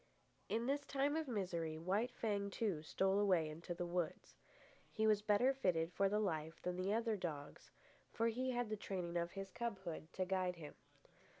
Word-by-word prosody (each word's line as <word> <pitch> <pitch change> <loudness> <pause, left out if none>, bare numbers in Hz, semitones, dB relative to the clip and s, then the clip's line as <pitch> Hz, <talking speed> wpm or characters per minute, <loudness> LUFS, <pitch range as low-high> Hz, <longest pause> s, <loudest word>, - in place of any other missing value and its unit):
In 230 +2 +1
this 285 +2 +1
time 280 +1 +1
of 320 -2 0
misery, 175 -8 -1
White 195 +9 +1
Fang, 200 -3 0
too, 200 -6 -1
stole 190 +5 +2
away 185 -6 +4
into 165 +3 -5
the 175 - -2
woods. 175 -1 -2 0.6
He 220 - +1
was 215 -1 +5
better 215 +6 +4
fitted 175 -9 +1
for 195 0 +3
the 210 - +2
life 160 -6 -1
than 180 0 -1
the 185 +2 0
other 225 0 +2
dogs, 155 -7 -5 0.4
for 230 - +1
he 250 +3 0
had 245 -3 0
the 215 - 0
training 180 -4 -3
of 170 0 0
his 195 -1 -5
cubhood 190 -9 -4
to 185 - 0
guide 185 -1 +1
him. 155 -3 -8
195 Hz, 185 wpm, -40 LUFS, 170-220 Hz, 0.6 s, was